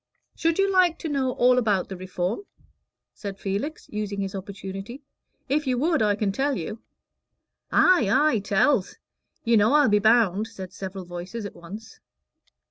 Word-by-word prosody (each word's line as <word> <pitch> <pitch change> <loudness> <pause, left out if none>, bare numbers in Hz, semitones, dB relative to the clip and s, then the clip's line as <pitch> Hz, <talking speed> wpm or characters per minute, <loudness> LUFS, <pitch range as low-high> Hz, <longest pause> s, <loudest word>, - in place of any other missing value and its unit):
"Should 330 0 +1
you 390 0 +3
like 365 -3 +4
to 320 - -5
know 265 -3 0
all 250 +1 +4
about 205 -6 +1
the 190 - -6
Reform?" 185 - -3 0.7
said 200 -2 -7
Felix, 205 - -4
using 210 -1 -3
his 195 -1 -3
opportunity. 195 +6 -7 0.4
"If 295 +2 0
you 255 -1 +1
would, 315 +2 +1
I 210 -1 +3
can 200 -1 0
tell 275 +6 0
you." 210 +6 -5 0.9
"Ay, 355 - +4
ay 290 -1 +3
tell's; 200 +2 +1 0.5
you 230 0 +4
know 215 +5 +4
I'll 295 -5 +5
be 210 0 +4
bound," 215 -2 +3
said 190 -5 -9
several 190 -1 -7
voices 180 +5 -6
at 200 - -7
once. 205 +6 -11
215 Hz, 160 wpm, -25 LUFS, 195-270 Hz, 0.9 s, I'll